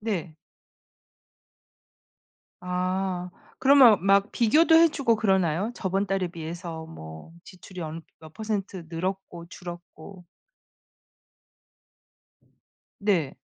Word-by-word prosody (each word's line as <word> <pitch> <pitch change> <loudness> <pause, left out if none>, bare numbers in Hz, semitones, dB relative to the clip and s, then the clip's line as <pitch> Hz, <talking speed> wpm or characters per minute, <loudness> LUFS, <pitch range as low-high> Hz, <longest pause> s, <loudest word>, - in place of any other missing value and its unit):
네. 185 -7 -3 2.3
아 180 0 -2 0.3
그러면 260 -8 +6
막 200 +1 +3
비교도 310 +8 +4
해 330 +1 +7
주고 270 -7 +1
그러나요? 190 -2 +1
저번 195 0 -1
달에 190 -1 -1
비해서 165 0 -7
뭐 80 - -11
지출이 185 0 -12
엄 160 +1 -6 0.2
몇 160 -1 -14
퍼센트 200 -5 -4
늘었고 175 0 -5
줄었고. 175 +1 -11 2.8
네. 180 -9 0
185 Hz, 175 characters per minute, -26 LUFS, 170-205 Hz, 2.8 s, 해